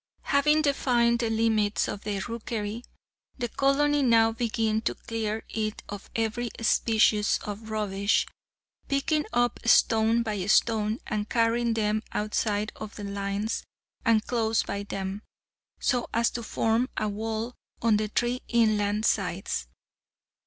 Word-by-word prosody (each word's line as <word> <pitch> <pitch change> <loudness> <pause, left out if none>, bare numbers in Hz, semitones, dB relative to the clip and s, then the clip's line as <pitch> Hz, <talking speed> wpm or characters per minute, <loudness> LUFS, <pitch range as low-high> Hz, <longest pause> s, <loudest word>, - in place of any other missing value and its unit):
Having 300 +2 +3
defined 240 -5 +2
the 230 -2 0
limits 220 -2 +1
of 200 - -5
the 205 -1 -1
rookery, 230 -1 -4 0.5
the 245 -2 -2
colony 285 +3 +2
now 230 -3 +4
begin 225 -1 0
to 230 - -1
clear 220 -1 -3
it 215 -1 -3
of 205 -1 -8
every 225 +2 -1
species 220 -1 +3
of 210 +2 -6
rubbish, 200 -1 +1 0.6
picking 300 +2 +1
up 240 0 +1
stone 225 0 +4
by 210 -4 -2
stone, 215 0 +3
and 210 0 -3
carrying 230 0 +2
them 215 -1 +1
outside 210 0 -1
of 215 - -8
the 205 - -7
lines, 200 +2 -2 0.4
and 225 -2 +3
close 225 -2 +1
by 200 - -4
them, 195 0 -4 0.6
so 245 -2 0
as 230 0 +2
to 240 - -4
form 225 +2 0
a 215 - 0
wall 220 +3 -3 0.3
on 225 -2 +4
the 215 0 -1
three 240 +4 -1
inland 215 -2 +2
sides. 185 - -1
220 Hz, 135 wpm, -27 LUFS, 210-235 Hz, 0.6 s, now